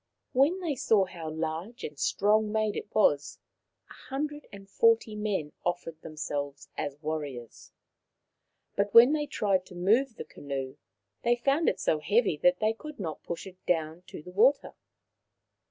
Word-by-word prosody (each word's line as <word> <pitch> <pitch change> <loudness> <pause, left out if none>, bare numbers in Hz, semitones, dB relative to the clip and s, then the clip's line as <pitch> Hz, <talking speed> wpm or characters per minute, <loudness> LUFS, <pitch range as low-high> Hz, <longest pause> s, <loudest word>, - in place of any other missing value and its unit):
When 295 +9 +3
they 330 -5 -1
saw 220 -6 +3
how 170 -3 -7
large 160 +8 -4
and 150 -2 -6
strong 210 +1 +2
made 215 -1 0
it - - -4
was, 145 -9 +2 0.5
a - - -13 0.2
hundred 295 +2 -4
and 195 -1 -11
forty 225 +1 +3
men 205 -8 -2
offered 170 -2 -3
themselves 145 -2 -5
as 140 -1 -4
warriors. 145 -6 -5 1.0
But 200 0 -1
when 240 +5 +9
they 295 -1 0
tried 195 -7 +1
to 180 - -12
move 225 +8 +2
the - - -7
canoe 135 -2 -6 0.4
they 240 0 +3
found 275 +6 +2
it - - -3
so 155 - +1
heavy 205 +4 +2
that 180 +4 +3
they 215 0 +2
could 300 +4 -10
not 160 -6 -5
push 170 - -6
it 185 -1 -13
down 160 -1 0
to - - -9
the 180 - -10
water. 235 +10 +3
195 Hz, 160 wpm, -29 LUFS, 155-230 Hz, 1.0 s, when